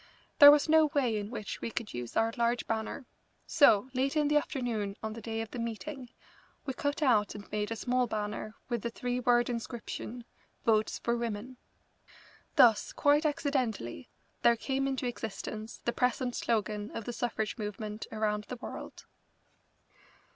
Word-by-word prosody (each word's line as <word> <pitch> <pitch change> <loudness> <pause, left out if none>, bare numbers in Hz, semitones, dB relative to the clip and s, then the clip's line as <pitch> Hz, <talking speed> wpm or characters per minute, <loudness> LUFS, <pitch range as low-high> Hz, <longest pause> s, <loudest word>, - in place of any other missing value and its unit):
There 285 - +12
was 295 +1 +6
no 315 0 +6
way 250 -6 +2
in 205 -1 -3
which 215 -4 -6
we - - -2
could 230 -2 -5
use 120 -1 -5
our 225 0 +2
large 235 0 +1
banner, 225 +4 -3 0.4
so, 265 -6 +5
late 270 +4 0
in 295 -1 +3
the 300 - +2
afternoon 230 -8 -2
on 220 0 -3
the 230 - -8
day 225 0 -3
of 225 - -6
the 245 - -5
meeting, 245 +3 -5 0.6
we 270 - -2
cut 285 +4 -1
out 215 -7 +3
and 205 -1 -10
made 210 0 -1
a 225 - -2
small 250 +2 +1
banner 215 0 -4
with 240 -3 -2
the 235 - -2
three 245 +1 -2
word 240 -1 +3
inscription: 235 0 -5 0.4
"Votes 215 -1 +2
for 235 - 0
Women." 235 +2 -4 1.0
Thus, 225 -4 +5
quite 295 +1 +3
accidentally, 245 - -2 0.3
there 235 - +5
came 270 +3 -1
into 265 -1 -2
existence 220 -1 -5
the 240 - +1
present 250 0 0
slogan 210 -2 -1
of 225 - -5
the 240 - -4
suffrage 225 -2 -2
movement 210 0 -5
around 210 -1 -1
the 250 - -6
world. 235 - -8
235 Hz, 165 wpm, -31 LUFS, 215-255 Hz, 1.0 s, There